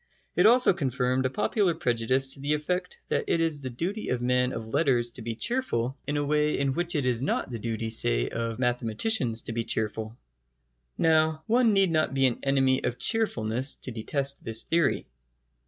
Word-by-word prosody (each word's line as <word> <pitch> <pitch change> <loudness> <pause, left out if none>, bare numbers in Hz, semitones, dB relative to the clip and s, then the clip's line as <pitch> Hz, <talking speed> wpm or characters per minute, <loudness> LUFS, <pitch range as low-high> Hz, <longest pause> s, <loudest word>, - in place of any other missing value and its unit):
It - - +5
also 245 -2 +6
confirmed 130 -5 0
a - - -4
popular 195 - 0
prejudice 120 +2 +1
to - - -10
the 145 +2 0
effect 180 - -3
that 465 - 0
it - - +1
is 160 -3 0
the 130 - -4
duty 180 - -4
of 125 - 0
men 125 +1 +1
of 110 -1 -7
letters 130 -6 +2
to 120 - -10
be 115 0 -4
cheerful 135 - -1
in 145 +1 -1
a 145 - 0
way 150 +1 +1
in 135 -1 0
which 175 +3 -2
it 145 -4 0
is 125 -2 0
not 135 -1 -1
the 115 - -4
duty, 115 0 -3
say, - - +2
of 115 -1 -3
mathematicians 120 - 0
to - - -5
be 115 0 -2
cheerful. 110 +1 -2 0.8
Now, 155 -1 +2
one 235 0 +3
need 195 -3 +3
not 155 -4 +1
be 135 0 +3
an 125 -3 0
enemy 135 -1 +1
of 125 - -2
cheerfulness 130 - 0
to 130 - -4
detest 135 +5 -2
this 115 0 0
theory. 165 -4 +1
135 Hz, 190 wpm, -27 LUFS, 115-160 Hz, 0.8 s, also